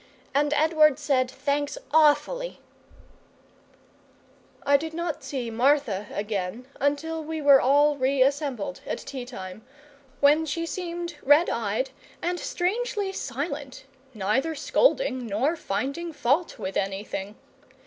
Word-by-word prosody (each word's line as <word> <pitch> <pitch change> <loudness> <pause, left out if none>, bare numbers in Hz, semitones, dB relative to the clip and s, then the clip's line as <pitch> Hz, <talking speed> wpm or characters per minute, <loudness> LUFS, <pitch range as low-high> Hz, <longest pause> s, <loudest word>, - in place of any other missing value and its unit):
And 290 +1 +2
Edward 305 -2 +4
said, 275 -4 +1
Thanks 285 +2 -2 0.2
AWFULLY" 320 +12 +3 2.1
I 285 - +5
did 320 +3 -1
not 340 -2 -3
see 250 -5 -4
Martha 235 -4 +2
again 205 +2 -3
until 315 +3 -1
we 320 +1 -4
were 285 -2 +7
all 290 +3 +4
re 260 0 +3
assembled 275 - -2
at - - -2
tea 260 -3 -7
time, 195 -4 -8 0.6
when 300 +3 +4
she 335 +3 -2
seemed 345 0 -5
red 295 +5 +5
eyed - - -1 0.3
and 355 +1 -2
strangely 410 +2 -1
silent, 280 -5 -5 0.3
neither 235 +11 0
scolding 285 - +1
nor 250 +11 +1
finding 280 +8 -3
fault 290 +6 0
with 190 - -4
anything. 195 +1 -3
285 Hz, 120 wpm, -26 LUFS, 250-320 Hz, 2.1 s, were